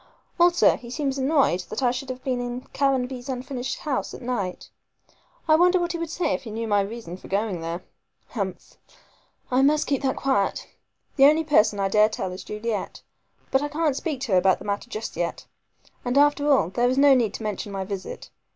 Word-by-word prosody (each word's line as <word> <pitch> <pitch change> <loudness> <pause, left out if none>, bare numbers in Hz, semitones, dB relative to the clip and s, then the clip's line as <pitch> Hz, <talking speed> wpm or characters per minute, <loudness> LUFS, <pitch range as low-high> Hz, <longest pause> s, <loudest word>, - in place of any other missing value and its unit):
Also 345 0 +5
he 240 - -11
seems 275 +1 -2
annoyed 270 - +2
that - - -3
I 245 - +4
should 260 +2 -5
have 255 0 -6
been 255 -2 -1
in 245 +1 -4
Caranby's 265 -2 0
unfinished 255 0 -4
house 290 -4 -2
at - - -11
night. 200 -7 -3 0.8
I 310 - +5
wonder 360 +2 +4
what 345 0 -1
he 340 - -4
would 335 -1 -3
say 325 -2 -1
if - - -2
he 230 - -9
knew 225 +1 -4
my 205 -1 +3
reason 200 -3 -6
for - - -13
going 200 -3 -1
there. 165 +2 -4 0.5
Humph! 190 -6 -5 0.7
I 255 +1 +3
must 300 +2 +3
keep 275 -2 0
that 265 -2 0
quiet. 265 -8 0 0.5
The 270 - +7
only 310 +3 +5
person 215 -9 +3
I 195 - +2
dare 210 +2 +4
tell 190 -4 -4
is 185 - -7
Juliet; 210 0 -4 0.5
but 265 - +3
I 290 - -1
can't 300 -1 0
speak 285 -2 -3
to 265 -6 -3
her 185 - +5
about 190 0 +3
the 195 - -11
matter 205 +3 -3
just 220 -1 -5
yet. 170 -1 -3 0.6
And 250 +2 0
after 290 0 +4
all, 260 - +3
there 240 +6 +1
is 260 - 0
no 280 0 +7
need 230 -5 +1
to - - -6
mention 210 -1 -4
my 195 -1 -3
visit. 200 - -7
250 Hz, 210 wpm, -24 LUFS, 205-280 Hz, 0.8 s, The